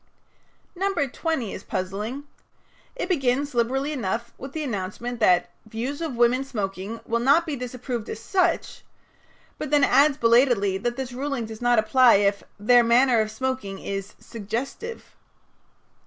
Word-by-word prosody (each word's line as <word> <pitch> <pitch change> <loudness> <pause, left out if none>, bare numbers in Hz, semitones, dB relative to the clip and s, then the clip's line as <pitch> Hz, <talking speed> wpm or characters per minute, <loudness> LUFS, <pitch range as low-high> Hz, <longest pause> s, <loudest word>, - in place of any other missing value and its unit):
No. 390 +2 -1
20 285 - -2
is - - -8
puzzling. 210 +9 -4 0.7
It - - -3
begins, 280 -4 0
liberally 260 +5 0
enough, 235 -2 -3
with 270 +1 -9
the 315 - -3
announcement 230 +1 -4
that 180 -5 +3 0.2
"Views 245 +8 -4
of 315 -6 -3
women 240 +2 +3
smoking 205 -3 -5
will 230 +1 0
not 280 +8 +4
be 310 -4 -3
disapproved 250 -2 -5
as - - -5
such," 355 - 0 0.8
but 305 - -4
then 295 -1 +3
adds 280 +2 +4
belatedly 230 -5 +3
that 240 +4 -2
this 260 -2 -5
ruling 270 -2 -3
does 220 0 -9
not 245 0 +3
apply 240 +3 +5
if 200 0 +2 0.2
"their 240 +3 +5
manner 235 0 +4
of 215 - -2
smoking 240 -4 -3
is 195 +1 -5
suggestive." 235 - -6
245 Hz, 145 wpm, -24 LUFS, 220-275 Hz, 0.8 s, apply